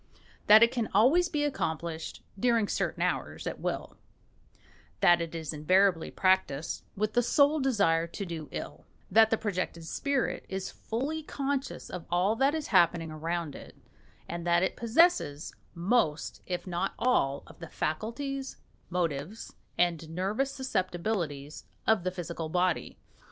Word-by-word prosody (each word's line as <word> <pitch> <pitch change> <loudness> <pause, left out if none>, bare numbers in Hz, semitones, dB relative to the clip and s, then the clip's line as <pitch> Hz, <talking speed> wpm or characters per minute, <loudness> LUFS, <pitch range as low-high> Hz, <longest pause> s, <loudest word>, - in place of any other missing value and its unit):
that 215 +2 +9
it 235 - +5
can 235 -4 -2
always 305 - +5
be 295 -3 0
accomplished 165 - -3 0.2
(during 230 -2 +3
certain - - -1
hours) - - -2
at - - -4
will; - - -4 1.0
that 175 -1 +5
it 170 0 -4
is 160 -1 -4
invariably 180 +3 +3
practised 185 -6 +1
with 215 +2 -1
the 245 - +4
sole 285 +5 +3
desire 200 - +2
to 200 +4 -6
do 160 -5 -6
ill; - - -7 0.2
that 220 +2 +6
the 225 - +2
projected 185 -6 -3
spirit 275 - -1
is 190 0 -4
fully 280 +8 -3
conscious 280 -2 -3
of 180 -2 -7
all 180 +5 +2
that 270 +5 +2
is 310 -2 -4
happening 170 -4 +3
around 165 0 -3
it; - - -11 0.5
and 170 0 -5
that 175 +1 +3
it 190 - 0
possesses 235 - +2 0.2
most 170 -4 0
if 180 -1 -3
not 175 -1 -2
all 145 - +1
of - - -16
the 165 -2 -8
faculties, 265 - -3 0.3
motives, 170 +2 -3 0.2
and 170 -2 +1
nervous 195 +11 -1
susceptibilities 180 - -3 0.2
of 220 -5 +3
the 185 - 0
physical 170 -3 -5
body. 180 +1 0
185 Hz, 145 wpm, -29 LUFS, 165-235 Hz, 1.0 s, that